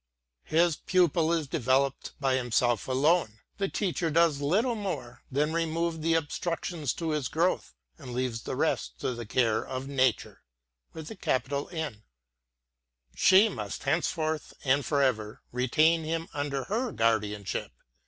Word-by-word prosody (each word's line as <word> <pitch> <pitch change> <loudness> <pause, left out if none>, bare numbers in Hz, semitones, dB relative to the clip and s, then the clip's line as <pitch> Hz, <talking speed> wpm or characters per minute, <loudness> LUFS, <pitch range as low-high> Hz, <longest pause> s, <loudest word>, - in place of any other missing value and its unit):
I - - -2
lis 170 -1 +4
pupil 170 -3 +2
is 165 -4 0
developed 135 -1 0
by 135 -2 +1
himself 120 -2 +1
alone. 135 -3 +2 0.2
The 195 -1 0
teacher 180 -4 -1
does 160 -2 +3
little 205 - +2
more 185 - -5
than 150 +4 +1
remove 165 0 -1
the 165 +1 +2
obstructions 165 -1 -2
to 165 -2 -3
his 150 -4 -1
growth, 170 - 0 0.2
and 125 - -8
leaves 120 -2 -2
the - - -4
rest - - -1
to 130 - -1
the 120 -2 -7
care 115 -1 +2
of 130 +1 -5
Nature. 130 -4 0 2.7
She 195 +3 +6
must 105 - -5
henceforth 155 +1 -1
and 140 +1 +3
for 140 -1 +1
ever 110 -5 -1
retain 155 +7 +3
him 165 +1 -3
under 145 -2 -2
her 230 - -1
guardianship. 105 -3 0
145 Hz, 135 wpm, -28 LUFS, 125-165 Hz, 2.7 s, She